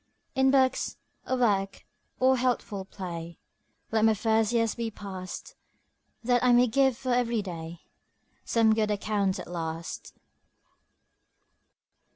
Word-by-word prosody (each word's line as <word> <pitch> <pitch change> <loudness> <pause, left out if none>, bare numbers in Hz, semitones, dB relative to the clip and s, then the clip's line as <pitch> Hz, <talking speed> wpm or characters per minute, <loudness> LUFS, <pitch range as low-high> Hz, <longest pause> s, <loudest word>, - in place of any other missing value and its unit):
In 265 0 +3
books, 265 -1 +2 0.3
or 260 - 0
work, 200 -5 0 0.3
or 260 +1 +5
healthful 240 -6 -1
play, 170 -4 -7 0.5
Let 220 -1 +2
my 220 -1 +5
first 220 +1 +2
years 230 -2 +1
be 230 -1 -3
passed, 190 -3 -8 0.7
That 245 +1 +2
I 250 -1 +5
may 245 +1 +6
give 265 +1 +2
for 255 -2 -1
every 235 -3 +1
day 170 -2 -7 0.6
Some 225 -1 +3
good 215 -1 +1
account 205 -2 0
at - - -6
last. 165 -1 -6
220 Hz, 125 wpm, -28 LUFS, 190-245 Hz, 0.7 s, may